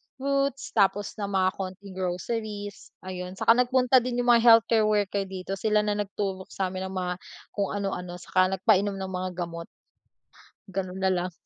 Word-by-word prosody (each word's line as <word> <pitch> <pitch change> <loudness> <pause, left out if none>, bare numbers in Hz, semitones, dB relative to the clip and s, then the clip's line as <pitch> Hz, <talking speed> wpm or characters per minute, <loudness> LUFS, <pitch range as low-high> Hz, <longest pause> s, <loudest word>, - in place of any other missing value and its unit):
fruits, 275 0 -1
tapos 205 -1 +2
ng 200 - -2
mga 190 -2 +2
konting 190 +1 -6
groceries, 205 +3 -4
ayun. 185 0 -6
Saka 225 - +4
nagpunta 255 +1 +4
din 245 0 -2
yung 245 - +4
mga 235 -1 +5
healthcare 225 -1 +6
worker 205 -2 0
dito, 190 +1 -5
sila 210 -1 +2
na 210 0 -1
nagturok 195 -2 -3
samin 190 0 -3
ng 190 - -8
mga 180 -1 -1 0.4
kung 200 -1 -1
ano-ano 180 -3 -3
saka 185 +1 +1
nagpainom 195 +2 +2
ng 190 -1 -5
mga 185 0 -2
gamot. 170 -1 -5 1.0
Gano'n 190 0 -4
nalang. 185 -1 0
195 Hz, 155 wpm, -27 LUFS, 185-215 Hz, 1.0 s, healthcare